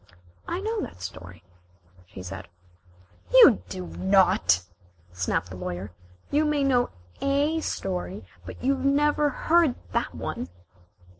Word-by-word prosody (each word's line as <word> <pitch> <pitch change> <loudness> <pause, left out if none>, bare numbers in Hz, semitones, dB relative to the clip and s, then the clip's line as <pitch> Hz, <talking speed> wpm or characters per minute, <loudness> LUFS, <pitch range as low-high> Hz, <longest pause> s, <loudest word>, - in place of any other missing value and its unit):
"I 350 +2 -2
know 440 +1 -2
that - - -7
story," 90 -1 -9 0.6
she 95 -1 -10
said. 95 +1 -7 0.8
"You 480 - +8
do 185 -1 -5
not," 185 - +3 0.5
snapped 90 0 -1
the - - -6
Lawyer. 90 +1 -5 0.4
"You 295 +2 +3
may 300 -2 +1
know 250 -3 +2 0.3
a 285 +4 +1
story, 190 - -4 0.2
but - - -10
you 275 +2 +3
never 290 +2 +2
heard 315 0 +3 0.2
that - - -1
one." 85 - -4
245 Hz, 125 wpm, -26 LUFS, -, 0.8 s, You